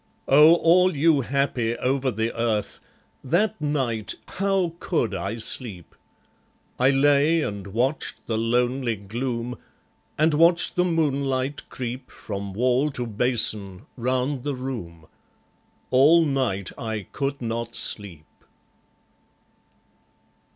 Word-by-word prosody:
Oh, 150 +4 +7
all 175 0 +4
you 150 -1 +4
happy 130 -3 -1
over 130 +2 0
the 110 0 -2
earth, 115 -3 -1 0.4
That 175 +6 0
night, 130 -8 -1
how 195 -3 0
could 150 -10 -1
I 100 +3 -3
sleep? 110 -6 -4 0.9
I 130 +2 +5
lay 145 +3 +3
and 100 -4 -5
watched 125 +9 -2
the 115 - -2
lonely 120 +2 0
gloom; 120 +4 -4 0.6
And 155 +1 +3
watched 170 +3 +3
the 180 - +2
moonlight 140 -5 -1
creep 125 +1 -6
From 100 -1 -6
wall 125 +6 +2
to 125 - -3
basin, 110 -3 0
round 130 +2 -1
the 145 -1 -2
room, 110 -12 -6 0.9
All 150 +6 +6
night 130 - -1
I 110 -4 -4
could 140 0 -3
not 115 0 -4
sleep. 90 -7 -4
130 Hz, 110 wpm, -24 LUFS, 115-145 Hz, 0.9 s, Oh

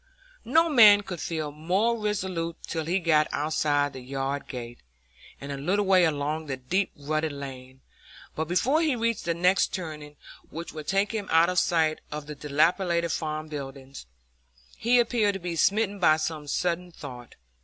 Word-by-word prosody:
No 330 +1 +4
man 215 -9 +7
could 185 -5 -7
feel 155 -2 -3
more 185 +10 0
resolute 190 -6 -3
till 160 -2 -3
he 175 +4 +1
got 155 -3 +3
outside 145 -1 0
the 130 - -7
yard 135 +2 -4
gate, 120 -2 -7 0.6
and 140 +1 -7
a 140 - -4
little 190 +9 0
way 185 -2 +5
along 155 +1 -2
the 135 -2 -3
deep 180 +10 -1
rutted 155 +2 -2
lane; 130 -2 -9 0.5
but 160 - -1
before 255 - +2
he 310 -5 +1
reached 230 -2 -1
the 170 -1 0
next 180 +3 +2
turning, 150 -4 -7 0.3
which 165 +2 -7
would 155 -1 -8
take 195 +1 +1
him 215 -3 -4
out 165 +2 +5
of 180 -1 +2
sight 160 -4 +1
of 150 -1 -5
the 150 - -7
dilapidated 170 +4 +1
farm 155 -1 -3
buildings, 135 - -8 0.7
he 240 +2 +2
appeared 230 -3 +2
to - - -4
be 175 -1 -4
smitten 205 +3 +1
by 155 -4 +5
some 155 -1 -4
sudden 180 +3 -1
thought. 125 -7 -10
160 Hz, 170 wpm, -26 LUFS, 145-190 Hz, 0.7 s, man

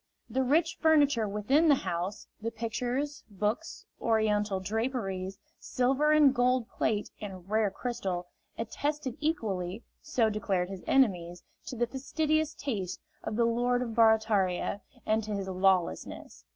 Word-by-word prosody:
The 265 - +1
rich 315 +6 +2
furniture 290 -8 +4
within 260 +11 +2
the 290 - +7
house 180 -3 -3 0.2
the 225 - -1
pictures, 245 +6 -3
books, 210 - -3 0.2
Oriental 210 -3 +1
draperies, 195 -3 -2 0.2
silver 270 +4 +1
and 300 -3 +6
gold 250 -1 +2
plate 210 -1 -1
and 190 -3 -7
rare 215 0 +2
crystal 190 -5 -3 0.3
attested 280 +3 -2
equally 210 - -2 0.2
so 255 -8 +1
declared 195 -4 -1
his 190 -2 -7
enemies 180 -9 +2 0.2
to - - -5
the 240 0 +1
fastidious 310 +5 -1
taste 200 -10 -3 0.2
of - - -3
the 235 +1 +3
Lord 245 +2 +1
of 230 -2 -5
Barataria 215 -4 +3 0.2
and 220 +1 +1
to 210 0 -3
his 195 -1 -3
lawlessness. 185 -1 0
225 Hz, 135 wpm, -30 LUFS, 195-265 Hz, 0.3 s, the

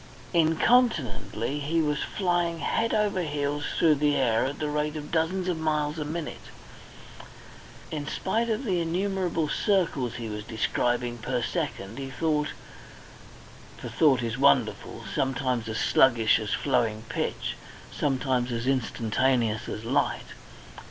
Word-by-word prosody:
Incontinently 160 - +2
he 155 +3 0
was 150 -2 +1
flying 175 -3 0
head 225 +9 0
over 210 -3 +1
heels 145 -2 -2
through 160 -2 +5
the 145 0 +2
air 120 -4 +2
at 140 +2 -3
the 150 - -2
rate 150 +1 -1
of 150 -1 -6
dozens 175 +3 0
of 175 -3 -1
miles 155 0 0
a - - -1
minute. 155 +1 -5 1.4
In 150 -2 -4
spite 230 +8 -1
of 225 +4 -1
the 185 -5 +1
innumerable 180 -1 -1
circles 150 - 0
he 115 -2 -5
was 105 -1 -5
describing 120 +2 -1
per 125 +2 -2
second, 130 - -3
he 135 -1 -5
thought; 150 +2 0 1.3
for - - -7
thought 135 -6 +3
is 115 +2 -3
wonderful 140 - +2
sometimes 130 -3 -1
as 110 - -3
sluggish 120 -4 +4
as 110 -1 -4
flowing 115 -5 0
pitch, - - -2 0.4
sometimes 130 -3 0
as 115 0 -2
instantaneous 120 -2 +1
as 110 - -5
light. - - 0
145 Hz, 135 wpm, -27 LUFS, 120-165 Hz, 1.4 s, through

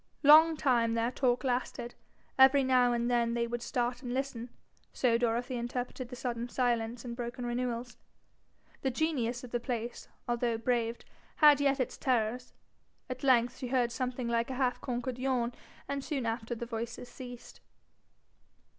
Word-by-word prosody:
Long 315 +2 +8
time 235 -5 +2
their 230 +1 +1
talk 250 -1 +1
lasted. 245 -2 -2 0.4
Every 265 +1 +6
now 255 -1 +4
and 235 0 0
then 235 -1 +1
they 235 0 +1
would 240 0 -4
start 245 +1 -2
and 245 -1 -4
listen 255 -3 -3 0.4
so 245 -3 +2
Dorothy 240 +2 0
interpreted 245 +1 -4
sudden 240 -1 -3
silence 240 -1 -1
and 235 -1 -5
broken 245 +1 -5
renewals. 240 0 -3 0.8
The 265 - +1
genius 255 -4 -1
of 250 - -9
the 240 - 0
place, 240 -1 -4 0.2
although 240 -1 0
braved, 235 0 -1 0.3
had 295 -2 +6
yet 275 -1 +3
his 255 - -3
terrors. 245 -1 0 0.6
At 255 +1 -6
length 245 -2 +3
she 255 - -4
heard 245 -1 +1
something 250 +1 -3
like 235 +1 0
a 260 - -3
half 250 -1 0
conquered 245 -1 -3
yawn, 250 -2 0 0.3
and 280 -1 -3
soon 275 -5 -2
after 225 +1 -2
the 235 - -5
voices 235 +1 -5
ceased. 245 -2 -10
245 Hz, 155 wpm, -31 LUFS, 235-255 Hz, 0.8 s, Long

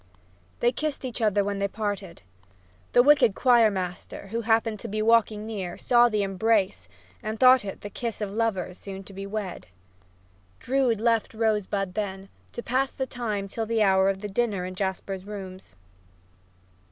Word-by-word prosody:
They 240 - +4
kissed 295 +1 -3
each 245 -1 -5
other 205 -2 +3
when 200 0 -2
they 200 - +1
parted. 200 - -5 0.7
The 245 - +7
wicked 265 -7 +5
choir 240 -4 +5
master, 185 0 -5
who 230 +3 -2
happened 225 -1 +1
to - - -7
be 215 +2 -3
walking 215 -1 +3
near, 195 -6 -5
saw 240 -1 +4
the 210 -2 0
embrace 195 - 0 0.3
and 215 +1 -4
thought 255 -1 +7
it 195 - -7
the 205 - -6
kiss 235 0 -4
of 210 -2 -3
lovers 200 -5 -2
soon 195 -1 -8
to 195 - -13
be 195 +1 -6
wed. 200 -3 -5 0.9
Drood 255 -4 +1
left 230 -1 +1
Rosebud 210 -4 0
then, 195 -1 -4 0.2
to 240 - -6
pass 265 +2 0
the 265 - -3
time 215 -6 -3
till 225 +3 -4
the 225 -1 +2
hour 190 -1 +4
of 195 0 -2
the 210 - -4
dinner 205 -3 -1
in 185 - -5
Jasper's 190 0 -3
rooms. 190 - -9
210 Hz, 170 wpm, -26 LUFS, 195-230 Hz, 0.9 s, The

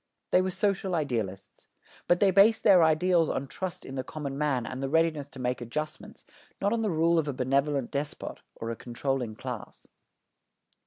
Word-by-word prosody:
They 180 - +5
were 185 - -1
social 195 -1 0
idealists. 110 - -3 0.4
But 175 - +4
they 200 -2 +5
based 205 +4 +5
their 190 -4 +7
ideals 165 +1 +3
on 135 - -2
trust 185 +6 -5
in 135 - -8
the 130 -1 -3
common 140 0 -5
man 140 -4 0
and 130 +1 -5
the 135 - -2
readiness 160 -2 +1
to 135 - -12
make 125 -1 -1
adjustments, 150 +6 -6 0.3
not 205 - +1
on 230 - 0
the 215 - 0
rule 165 0 +3
of 155 - -1
a 145 - -1
benevolent 135 +1 0
despot 145 +1 -4 0.2
or 115 0 -4
a - - -3
controlling 120 -1 -3
class. - - -7
150 Hz, 180 wpm, -28 LUFS, 130-175 Hz, 0.4 s, their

